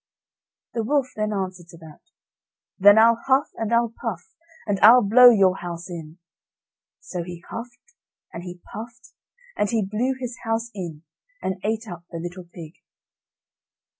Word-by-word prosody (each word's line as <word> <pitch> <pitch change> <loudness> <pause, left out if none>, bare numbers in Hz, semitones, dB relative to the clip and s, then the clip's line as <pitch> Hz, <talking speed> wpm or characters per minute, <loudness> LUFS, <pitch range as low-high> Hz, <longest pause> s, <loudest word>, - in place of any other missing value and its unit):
The 230 - -1
wolf 265 +1 0
then 215 0 -1
answered 185 -3 -4
to 170 - -14
that: 160 -2 -14 0.8
"Then 205 +2 +7
I'll 230 +1 +5
huff, 270 +1 +2
and 225 -1 -4
I'll 235 -1 +2
puff, 180 -8 -5 0.3
and 205 -2 -1
I'll 240 +2 +8
blow 245 +5 +8
your 195 -5 +4
house 175 0 -7
in." 160 -1 -8 0.8
So 180 - -6
he 170 0 -9
huffed, 245 +3 -9 0.4
and 170 - -6
he 180 0 -9
puffed, 230 +3 -10 0.4
and 210 - 0
he 225 -4 0
blew 235 +7 -1
his 250 -1 -6
house 225 0 -2
in, 170 -6 -7 0.4
and 190 -1 -4
ate 220 +2 -2
up 175 -3 -9
the 170 - -7
little 175 +2 -7
pig. 165 -2 -11
205 Hz, 155 wpm, -23 LUFS, 175-230 Hz, 0.8 s, I'll